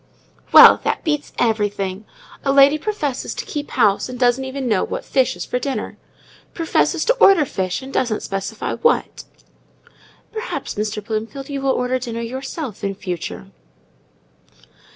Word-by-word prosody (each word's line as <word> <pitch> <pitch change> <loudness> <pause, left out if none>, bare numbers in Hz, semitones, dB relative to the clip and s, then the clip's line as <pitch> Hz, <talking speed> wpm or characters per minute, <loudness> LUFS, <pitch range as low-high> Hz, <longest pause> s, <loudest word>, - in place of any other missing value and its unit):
"Well, - - +9
that - - -1
beats 295 -3 -2
everything! 205 -3 -1 0.4
A 275 - +1
lady 280 +2 +6
professes 300 -10 -3
to - - -5
keep 295 -2 -5
house, 200 +4 +2
and 250 - -6
doesn't 250 +1 +2
even 265 0 -4
know 210 -5 +2
what - - -5
fish 260 -8 +1
is 175 - -6
for 250 - -2
dinner! 275 +1 -4 0.6
professes 330 -2 +1
to - - +4
order 390 -8 +6
fish, 185 -2 -3
and 270 - -9
doesn't 235 -4 0
specify 195 +2 -4
what!" 470 - 0 1.1
"Perhaps, 445 +2 -4
Mr. 210 0 -3
Bloomfield, 230 +6 -4
you 275 -1 -3
will 270 - 0
order 255 0 0
dinner 235 -2 -5
yourself 260 - -6
in 195 -1 -2
future." 180 -3 -6
250 Hz, 150 wpm, -20 LUFS, 210-280 Hz, 1.1 s, Well